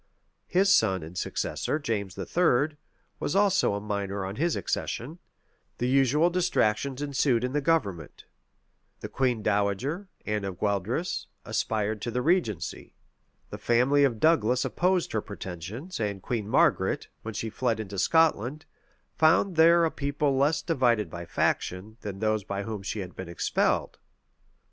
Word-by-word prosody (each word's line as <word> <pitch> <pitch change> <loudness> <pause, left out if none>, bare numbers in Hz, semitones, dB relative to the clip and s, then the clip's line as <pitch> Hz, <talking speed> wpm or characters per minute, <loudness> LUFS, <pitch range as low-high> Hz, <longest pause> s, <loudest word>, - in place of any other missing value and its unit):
His 195 +2 +4
son 95 -6 +2
and 80 +3 -10
successor, 145 - -2
James 105 -9 -3
III., 155 -3 +1 0.4
was 145 - -2
also 195 - +3
a - - -2
minor 100 -2 -3
on 95 +2 -6
his 170 +3 +1
accession: 150 +9 -3 0.6
the 125 - -1
usual 135 +6 +3
distractions 140 -6 0
ensued 135 -4 +1
in 125 +1 -2
the 150 - +1
government: 100 - -1 0.8
the - - -4
queen 125 -5 0
dowager, 105 - 0 0.2
Anne 105 -1 -1
of 95 -2 -4
Gueldres, 105 - -1 0.2
aspired 110 -1 -1
to 120 - -3
the 125 +2 -2
regency: 110 - -1 0.6
the - - -6
family 130 +5 +3
of 120 -6 +1
Douglas 125 -6 +3
opposed 180 -1 +1
her 110 - 0
pretensions: 100 - -7
and 100 -3 -2
Queen 110 -4 -3
Margaret, - - +2
when 110 -1 -7
she 110 +1 -3
fled 115 -1 -1
into 100 -3 -5
Scotland, 155 - +2 0.5
found 165 +4 +3
there 165 +1 +6
a 160 - 0
people 145 +1 -1
little 135 -1 +1
less 150 +3 +2
divided 120 - +1
by 85 0 -6
faction, 95 +6 -1
than 100 -2 -6
those 110 0 0
by 100 +1 -4
whom 110 -1 -5
she 100 +1 -4
had 90 -1 -8
been 95 -2 -7
expelled. 85 - 0
120 Hz, 150 wpm, -27 LUFS, 100-150 Hz, 0.8 s, there